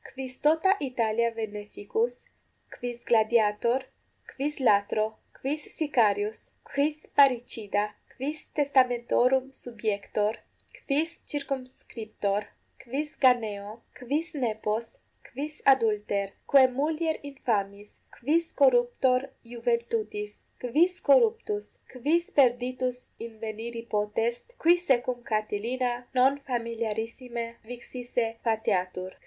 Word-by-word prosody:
quis 260 Hz, -1 st, -6 dB
tota 320 Hz, +6 st, +4 dB
Italia 235 Hz, -4 st, +1 dB
veneficus, 220 Hz, +2 st, -3 dB, 0.5 s
quis 240 Hz, -1 st, -6 dB
gladiator, 230 Hz, +2 st, +3 dB, 0.5 s
quis 290 Hz, +2 st, -2 dB
latro, 215 Hz, -2 st, +2 dB, 0.2 s
quis 295 Hz, +3 st, -2 dB, 0.2 s
sicarius, 220 Hz, -8 st, +1 dB, 0.2 s
quis 295 Hz, +2 st, +1 dB, 0.2 s
parricida, 235 Hz, -6 st, +3 dB, 0.3 s
quis 290 Hz, +4 st, -3 dB, 0.2 s
testamentorum 260 Hz, -1 st, +3 dB
subiector, 215 Hz, -3 st, -2 dB, 0.5 s
quis 310 Hz, +4 st, 0 dB
circumscriptor, 255 Hz, -7 st, -3 dB, 0.4 s
quis 285 Hz, +5 st, -4 dB
ganeo, 220 Hz, -4 st, +2 dB, 0.2 s
quis 295 Hz, +8 st, -2 dB
nepos, 220 Hz, 0 st, -1 dB, 0.5 s
quis 295 Hz, +4 st, -4 dB, 0.2 s
adulter, 210 Hz, -5 st, 0 dB, 0.2 s
quae 275 Hz, -2 st, +8 dB
mulier 315 Hz, +2 st, 0 dB
infamis, 205 Hz, -6 st, -2 dB, 0.3 s
quis 320 Hz, +7 st, +1 dB
corruptor 250 Hz, -1 st, +4 dB, 0.3 s
iuventutis, 230 Hz, -3 st, -1 dB, 0.3 s
quis 320 Hz, +9 st, +2 dB
corruptus, 450 Hz, -3 st, +3 dB, 0.3 s
quis 310 Hz, +7 st, 0 dB
perditus 250 Hz, -1 st, +2 dB, 0.2 s
inveniri 225 Hz, +1 st, -6 dB
potest, 215 Hz, +3 st, 0 dB, 0.2 s
qui 340 Hz, +2 st, +6 dB
se 310 Hz, -8 st, +3 dB
cum 245 Hz, -1 st, -3 dB
Catilina 225 Hz, +4 st, 0 dB, 0.2 s
non 265 Hz, +3 st, +4 dB
familiarissime 230 Hz, 0 st, -3 dB, 0.2 s
vixisse 245 Hz, 0 st, -3 dB, 0.2 s
fateatur? 185 Hz, -5 st, 0 dB
240 Hz, 90 wpm, -28 LUFS, 220-270 Hz, 0.5 s, quae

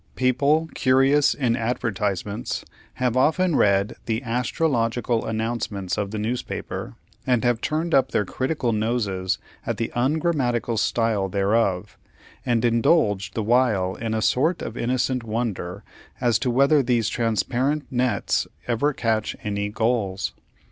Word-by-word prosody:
People, 140 Hz, +5 st, +2 dB
curious 135 Hz, +2 st, +3 dB
in 125 Hz, -5 st, +1 dB
advertisements, 110 Hz, -3 st, -2 dB, 0.3 s
have 125 Hz, -2 st, 0 dB
often 160 Hz, +6 st, +3 dB
read 100 Hz, -1 st, +2 dB
the 115 Hz, +2 st, -1 dB
"Astrological" 120 Hz, -1 st, 0 dB
announcements 110 Hz, -4 st, -2 dB
of 100 Hz, -1 st, -2 dB
the 110 Hz, -, -5 dB
newspapers, 110 Hz, -, -4 dB, 0.3 s
and 125 Hz, -3 st, +2 dB
have 120 Hz, -2 st, +1 dB
turned 160 Hz, +2 st, -1 dB
up 135 Hz, -1 st, +4 dB
their 105 Hz, -, 0 dB
critical 130 Hz, -, -1 dB
noses 105 Hz, -4 st, -1 dB, 0.3 s
at -, -, -3 dB
the 115 Hz, -, -2 dB
ungrammatical 130 Hz, -4 st, 0 dB
style 110 Hz, -3 st, +1 dB
thereof, 100 Hz, -1 st, 0 dB, 0.4 s
and 120 Hz, -1 st, +1 dB
indulged 115 Hz, -, +2 dB
the 110 Hz, -, -1 dB
while 110 Hz, -5 st, +2 dB
in 110 Hz, +1 st, -3 dB
a 110 Hz, -, 0 dB
sort 160 Hz, +10 st, +1 dB
of 115 Hz, -, -5 dB
innocent 125 Hz, +1 st, 0 dB
wonder 105 Hz, -4 st, -3 dB, 0.4 s
as 120 Hz, -3 st, +2 dB
to 125 Hz, -, 0 dB
whether 140 Hz, +4 st, +4 dB
these 120 Hz, -4 st, +1 dB
transparent 120 Hz, +6 st, 0 dB
nets 125 Hz, 0 st, 0 dB, 0.2 s
ever 135 Hz, +5 st, +1 dB
catch 110 Hz, -4 st, -1 dB
any 100 Hz, 0 st, -2 dB
gulls. 105 Hz, -3 st, -1 dB
120 Hz, 130 wpm, -24 LUFS, 105-130 Hz, 0.4 s, up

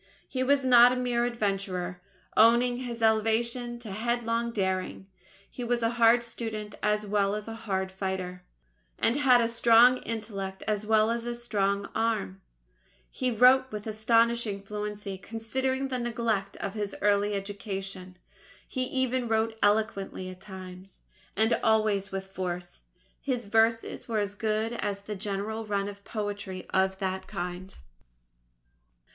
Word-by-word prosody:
He 255 Hz, -, -3 dB
was 275 Hz, +1 st, +3 dB
not 245 Hz, -1 st, +8 dB
a -, -, 0 dB
mere 245 Hz, -1 st, 0 dB
adventurer 195 Hz, -6 st, -2 dB, 0.3 s
owing 240 Hz, +2 st, +5 dB
his 240 Hz, -2 st, -5 dB
elevation 235 Hz, +2 st, +1 dB
to 220 Hz, -4 st, -8 dB
headlong 235 Hz, +2 st, -1 dB
daring 190 Hz, -3 st, -2 dB, 0.4 s
he 250 Hz, -, -7 dB
was 240 Hz, 0 st, 0 dB
a 230 Hz, -, +2 dB
hard 235 Hz, 0 st, +5 dB
student 220 Hz, -3 st, -5 dB
as 210 Hz, 0 st, +1 dB
well 200 Hz, 0 st, +1 dB
as 210 Hz, 0 st, -5 dB
a 225 Hz, -, -5 dB
hard 190 Hz, -4 st, -3 dB
fighter, 190 Hz, -1 st, -4 dB, 0.6 s
and 230 Hz, -, +2 dB
had 260 Hz, -4 st, +5 dB
a 230 Hz, -, +2 dB
strong 235 Hz, +2 st, +6 dB
intellect 205 Hz, -5 st, -5 dB
as 210 Hz, -1 st, -1 dB
well 220 Hz, 0 st, +4 dB
as 235 Hz, +1 st, -3 dB
strong 200 Hz, -3 st, 0 dB
arm. 220 Hz, -, -1 dB, 0.7 s
He 255 Hz, -, -1 dB
wrote 255 Hz, +3 st, +5 dB
with 210 Hz, -1 st, -6 dB
astonishing 230 Hz, -1 st, +1 dB
fluency 210 Hz, -1 st, -5 dB
considering 260 Hz, +6 st, -2 dB
the 255 Hz, -1 st, -2 dB
neglect 230 Hz, -4 st, -1 dB
of 200 Hz, -, -4 dB
his 205 Hz, -2 st, -3 dB
early 205 Hz, 0 st, +3 dB
education. 195 Hz, -2 st, -5 dB, 0.5 s
He 255 Hz, -1 st, -1 dB
even 260 Hz, -1 st, 0 dB
wrote 225 Hz, 0 st, +1 dB
eloquently 205 Hz, -3 st, 0 dB
at 185 Hz, 0 st, -13 dB
times, 185 Hz, -1 st, -10 dB, 0.3 s
and 220 Hz, +3 st, +3 dB
always 215 Hz, -3 st, +2 dB
with 195 Hz, 0 st, -4 dB
force. 180 Hz, -2 st, -5 dB, 0.4 s
His 250 Hz, -4 st, -2 dB
verses 225 Hz, +2 st, +1 dB
were 225 Hz, -2 st, -1 dB
as 205 Hz, -1 st, -1 dB
good 220 Hz, +2 st, -1 dB
as 205 Hz, -4 st, -3 dB
the 210 Hz, +1 st, -6 dB
general 205 Hz, +2 st, -3 dB
run 200 Hz, -2 st, -1 dB
of 200 Hz, 0 st, -9 dB
poetry 205 Hz, -4 st, -5 dB
of 190 Hz, 0 st, +2 dB
that 190 Hz, -1 st, -3 dB
kind. 180 Hz, +2 st, -6 dB
215 Hz, 140 wpm, -28 LUFS, 195-235 Hz, 0.7 s, not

